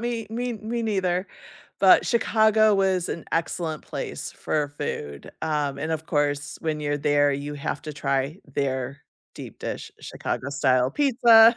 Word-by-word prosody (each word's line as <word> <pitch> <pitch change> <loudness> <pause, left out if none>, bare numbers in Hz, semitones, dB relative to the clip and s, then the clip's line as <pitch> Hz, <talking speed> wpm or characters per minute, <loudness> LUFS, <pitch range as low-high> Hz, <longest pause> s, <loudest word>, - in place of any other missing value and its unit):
me 235 -1 -2
me 245 +2 -2
me 225 +2 -3
neither, 190 -4 0 0.5
but - - +7
Chicago 220 -2 +4
was 190 -2 +1
an 170 - -4
excellent 165 -1 -1
place - - -5
for 150 -2 -1
food, 75 - -5
um, 145 -3 -1
and 155 +3 -3
of 160 0 -2
course, 145 -2 -1
when 155 -2 -1
you're 145 0 -1
there, 145 0 +3
you 145 +1 -4
have 145 0 -4
to 155 - -6
try 140 +2 -1 0.2
their 135 -1 -2 0.3
deep - - -9
dish - - -5
Chicago-style 130 -2 0
pizza, 235 -4 +6
155 Hz, 145 wpm, -25 LUFS, 145-215 Hz, 0.5 s, but